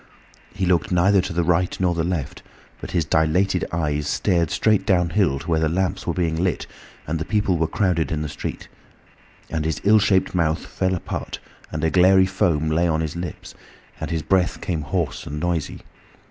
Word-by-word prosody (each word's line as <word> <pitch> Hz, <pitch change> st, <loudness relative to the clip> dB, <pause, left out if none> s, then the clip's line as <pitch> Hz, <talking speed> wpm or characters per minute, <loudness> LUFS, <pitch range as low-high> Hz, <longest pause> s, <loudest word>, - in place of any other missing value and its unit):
He 95 Hz, -, -2 dB
looked 90 Hz, -1 st, +1 dB
neither 95 Hz, +2 st, +4 dB
to 95 Hz, -, -5 dB
the 85 Hz, +1 st, 0 dB
right 90 Hz, +2 st, +1 dB
nor 90 Hz, -2 st, +2 dB
the 85 Hz, -1 st, -1 dB
left, 85 Hz, -5 st, -3 dB, 0.4 s
but -, -, -7 dB
his 85 Hz, -3 st, 0 dB
dilated 80 Hz, +4 st, +1 dB
eyes 75 Hz, -3 st, -1 dB
stared 85 Hz, +1 st, +1 dB
straight 110 Hz, +4 st, +2 dB
downhill 90 Hz, -4 st, +2 dB
to 70 Hz, -, -9 dB
where 80 Hz, -2 st, +2 dB
the 80 Hz, -1 st, +1 dB
lamps 90 Hz, +2 st, -1 dB
were -, -, +1 dB
being 85 Hz, -1 st, 0 dB
lit, 95 Hz, -, -1 dB, 0.4 s
and 80 Hz, +2 st, -2 dB
the -, -, -1 dB
people 105 Hz, -1 st, +1 dB
were 80 Hz, -, +2 dB
crowded 90 Hz, -5 st, 0 dB
in 75 Hz, -1 st, -1 dB
the -, -, -3 dB
street. -, -, -6 dB, 0.8 s
And 80 Hz, -2 st, -1 dB
his 80 Hz, -2 st, -2 dB
ill 105 Hz, +2 st, +6 dB
shaped 95 Hz, -2 st, +2 dB
mouth 80 Hz, -3 st, 0 dB
fell 95 Hz, 0 st, -1 dB
apart, 85 Hz, -, -5 dB, 0.3 s
and 80 Hz, 0 st, -4 dB
a 80 Hz, -, +2 dB
glairy 95 Hz, +1 st, +5 dB
foam 85 Hz, -5 st, 0 dB
lay 85 Hz, +2 st, +2 dB
on 80 Hz, -1 st, 0 dB
his 80 Hz, 0 st, -3 dB
lips, 85 Hz, 0 st, -6 dB, 0.5 s
and -, -, -4 dB
his 80 Hz, -2 st, -2 dB
breath 95 Hz, -1 st, +1 dB
came 85 Hz, -4 st, -2 dB
hoarse 80 Hz, +1 st, -3 dB
and 75 Hz, +1 st, -4 dB
noisy. 85 Hz, -2 st, -2 dB
85 Hz, 195 wpm, -22 LUFS, 80-95 Hz, 0.8 s, ill